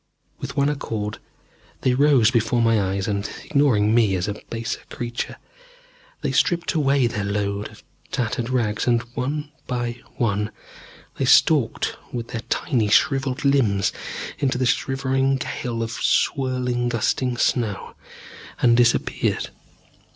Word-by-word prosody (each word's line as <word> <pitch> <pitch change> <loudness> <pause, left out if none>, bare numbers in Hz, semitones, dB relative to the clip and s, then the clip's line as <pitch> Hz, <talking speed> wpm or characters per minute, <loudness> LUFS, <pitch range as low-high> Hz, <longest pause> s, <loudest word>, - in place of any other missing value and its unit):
With - - -6
one 140 0 +3
accord 110 -7 -3 0.6
they 130 - +2
rose 130 -4 +4
before 120 0 +1
my 115 -2 +3
eyes 95 0 -1
and, 100 -1 -2
ignoring 120 -8 +3
me 110 -5 +4
as 90 +1 -1
a 105 - -1 0.2
baser 115 0 -3
creature, 120 0 -4 0.9
they - - -1
stripped 175 -3 +1
away 140 -4 +3
their 105 -3 -1
load 100 0 -2
of - - -16 0.3
tattered 120 0 -1
rags 115 -4 0
and, 120 -1 +3
one 145 +4 -3 0.2
by 120 -1 -3 0.2
one, 105 -2 0 0.7
they 135 - +1
stalked 140 -1 +3
with 120 -1 -5
their 115 -3 -4
tiny 120 -8 +1
shrivelled 135 +5 +2
limbs 115 -9 +2 0.5
into 135 -4 +1
the 130 - +1
shivering 135 +1 +1
gale 120 -3 -3
of 115 - -4
swirling, 125 -1 0
gusting 120 +2 0
snow, 115 -5 0 0.7
and 120 -1 +5
disappeared. 120 -1 +1
120 Hz, 130 wpm, -23 LUFS, 110-135 Hz, 0.9 s, and